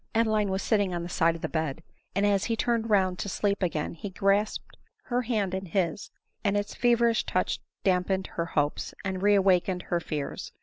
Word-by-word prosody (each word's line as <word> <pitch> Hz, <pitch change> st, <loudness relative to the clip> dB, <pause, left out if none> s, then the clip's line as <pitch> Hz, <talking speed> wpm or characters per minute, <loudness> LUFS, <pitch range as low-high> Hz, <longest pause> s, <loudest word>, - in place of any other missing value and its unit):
Adeline 215 Hz, -2 st, +2 dB
was 190 Hz, +1 st, -1 dB
sitting 205 Hz, -5 st, +1 dB
on 170 Hz, -, -3 dB
the 175 Hz, -, -6 dB
side 165 Hz, -1 st, +2 dB
of 165 Hz, -, -10 dB
the -, -, +1 dB
bed; 160 Hz, -1 st, -2 dB, 0.3 s
and 200 Hz, +1 st, +2 dB
as 200 Hz, -2 st, +2 dB
he 230 Hz, -, 0 dB
turned 230 Hz, 0 st, 0 dB
round 185 Hz, -3 st, +2 dB
to 200 Hz, -, -3 dB
sleep 200 Hz, +1 st, 0 dB
again 165 Hz, -4 st, -1 dB
he 170 Hz, +5 st, -6 dB
grasped 195 Hz, +3 st, 0 dB, 0.3 s
her 245 Hz, 0 st, 0 dB
hand 215 Hz, -6 st, -1 dB
in 190 Hz, 0 st, -3 dB
his, 185 Hz, +2 st, -1 dB, 0.3 s
and 205 Hz, 0 st, +2 dB
its 205 Hz, 0 st, -2 dB
feverish 235 Hz, -1 st, +3 dB
touch -, -, -1 dB, 0.2 s
damped 190 Hz, 0 st, +1 dB
her 170 Hz, -, -2 dB
hopes, 145 Hz, 0 st, 0 dB
and 190 Hz, -1 st, -2 dB
reawakened 190 Hz, -2 st, +3 dB
her 175 Hz, -, -1 dB
fears. 150 Hz, -4 st, -5 dB
195 Hz, 190 wpm, -28 LUFS, 180-210 Hz, 0.3 s, feverish